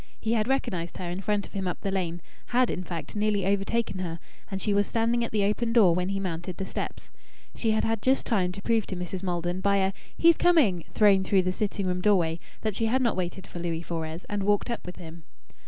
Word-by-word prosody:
He 225 - 0
had 215 -1 +1
recognized 180 -10 -1
her 175 -1 -4
in 180 +2 -4
front 205 0 0
of - - -15
him 195 -2 -2
up 180 - -3
the 195 - -2
lane 175 -3 -2 0.3
had, 245 0 +2
in 180 - -3
fact, 170 0 -6
nearly 205 -2 +1
overtaken 200 +1 0
her; 170 -3 -3 0.3
and 195 -2 -3
she 205 +1 0
was 205 0 +2
standing 235 +1 +1
at 230 - -3
the 210 -2 +1
open 230 +3 0
door 205 -8 +6
when 180 +2 0
he 195 0 -1
mounted 175 -1 -4
the 190 - -3
steps. - - -5 0.4
She 225 - -1
had 220 0 +2
had 225 -1 0
just 265 +3 +2
time 190 -6 +1
to 200 +1 -9
prove 230 -2 +1
to 190 - -4
Mrs. 180 +1 -4
Maldon, 175 0 -2
by 200 0 +3
a 190 0 +1 0.2
"He's 335 -1 +6
coming" 265 - +4
thrown 200 -3 +5
through 190 0 +3
the 185 - 0
sitting 200 0 -2
room 180 0 -1
doorway, 175 -5 +2 0.2
that 215 -3 -1
she 225 - +1
had 260 +3 +2
not 235 - +2
waited 185 +1 -3
for 175 - -8
Louis 170 -1 -2
Fores 165 0 -5
and 205 -1 -2
walked 205 +4 +1
up 235 - -5
with 180 - -6
him. 165 0 -10
195 Hz, 240 wpm, -27 LUFS, 180-220 Hz, 0.4 s, door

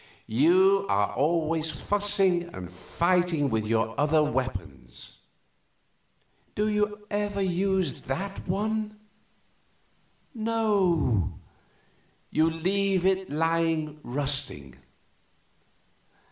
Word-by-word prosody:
You 190 - +4
are 100 +1 +1
always 160 +1 0
fussing 195 +1 +1
and 90 -1 -8
fighting 170 - 0
with 110 -1 -1
your 110 0 0
other 155 +1 +3
weapons. 95 - -5 1.3
Do 210 +1 0
you 210 0 -1
ever 205 -1 -1
use 190 0 0
that 195 +9 -5
one? 215 +3 -2 1.4
No; 205 - +1 1.0
you 160 +1 +3
leave 185 +3 0
it 190 0 +1
lying 160 -1 0
rusting. 130 - -2
170 Hz, 80 wpm, -27 LUFS, 145-200 Hz, 1.4 s, You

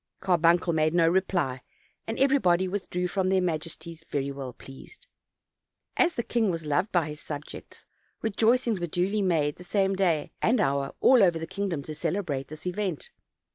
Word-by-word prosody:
Carbuncle 175 -1 +3
made 155 +1 +1
no 165 -1 +4
reply, 170 -7 0 0.5
and 225 - -3
everybody 190 -10 +3
withdrew 180 -2 -2
from 185 +1 0
their 190 0 +3
majesties 165 -1 -4
very 140 -1 -2
well 135 -2 -6
pleased. 135 - -13 0.9
As 355 -1 +2
the 235 - -1
king 225 -3 +1
was 165 -3 -3
loved 175 +7 0
by 170 -4 +2
his 150 0 -8
subjects, 150 -1 -8 0.4
rejoicings 225 +1 +2
were 175 - -2
duly 190 +6 0
made 160 -6 +1
the 180 - -11
same 195 +1 +1
day 175 -6 +1
and 235 +1 +3
hour 140 -5 0
all 255 -3 +6
over 175 -4 +4
the 165 - -4
kingdom 190 -5 -3
to 155 - -7
celebrate 155 -4 -2
this 155 +2 -10
event. 180 -3 -3
175 Hz, 170 wpm, -27 LUFS, 155-195 Hz, 0.9 s, all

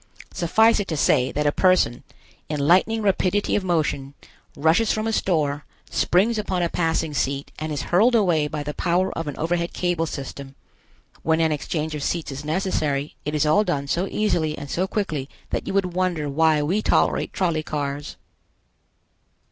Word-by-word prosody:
Suffice 220 +7 +3
it 200 - -2
to 160 - -2
say 130 -2 +3
that 150 +1 -1
a 145 - +4
person, 185 -10 +2 0.5
in 150 -1 -2
lightning 185 +9 +3
rapidity 200 0 +1
of 205 - 0
motion, 145 -6 -1 0.4
rushes 165 +9 +3
from 215 0 -1
a 225 - -1
store, 150 -7 0 0.3
springs 215 +6 +2
upon 185 -4 -1
a 170 - 0
passing 165 -2 0
seat 140 0 -2
and 155 +1 -4
is 145 -1 -2
hurled 220 +8 +3
away 175 -9 +3
by 150 0 -4
the 150 +1 -4
power 180 +3 0
of 165 -1 -4
an 145 - -5
overhead 170 +1 -1
cable 175 -2 0
system. 140 -1 -7 0.7
When 160 0 +1
an 160 -1 +2
exchange 155 +1 -2
of 150 - -4
seats 165 0 -2
is 135 +2 -6
necessary, 150 -4 -1
it 150 +1 -2
is 150 0 +2
all 180 +8 +4
done 150 -8 -1
so 175 +7 0
easily 165 -8 0
and 145 -1 -7
so 185 +2 0
quickly 155 -10 -3 0.2
that - - -2
you - - -2
would 185 -3 +1
wonder 175 -4 0
why 155 +1 +2
we 185 +8 0
tolerate - - +1
trolley 170 -4 0
cars. 145 -1 -4
160 Hz, 180 wpm, -23 LUFS, 150-185 Hz, 0.7 s, a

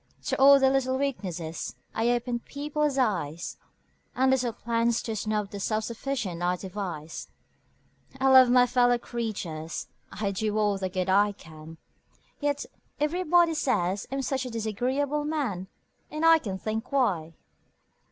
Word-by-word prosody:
To - - -1
all 280 +1 +9
their 265 -1 +4
little 260 -1 +1
weaknesses 180 -12 -3 0.2
I 225 +2 +1
open 240 0 0
people's 290 +2 -2
eyes 175 - -1 0.6
And 260 +1 +3
little 250 -2 +1
plans 230 0 0
to 225 - -3
snub 210 -1 -2
the 200 - -6
self 215 +2 -1
sufficient 230 -7 -3
I 180 +1 +1
devise; 180 -4 -6 0.9
I 265 0 +3
love 260 -1 +8
my 250 0 +6
fellow 245 -1 +3
creatures 190 -10 -5 0.2
I 205 -2 -2
do 210 +2 -1
all 205 -2 +1
the 190 -1 -2
good 185 0 -2
I 205 +2 +4
can 160 -2 -12 0.6
Yet 290 -1 -1 0.3
everybody 340 +2 +3
say 220 - +1 0.2
I'm 270 0 -2
such 265 0 -1
a 255 - -5
disagreeable 255 +7 -1
man! 265 - -2 0.4
And 305 +2 -2
I 330 0 +7
can't 195 -8 -5
think 220 +3 -4
why! 180 - 0
230 Hz, 145 wpm, -27 LUFS, 190-270 Hz, 0.9 s, all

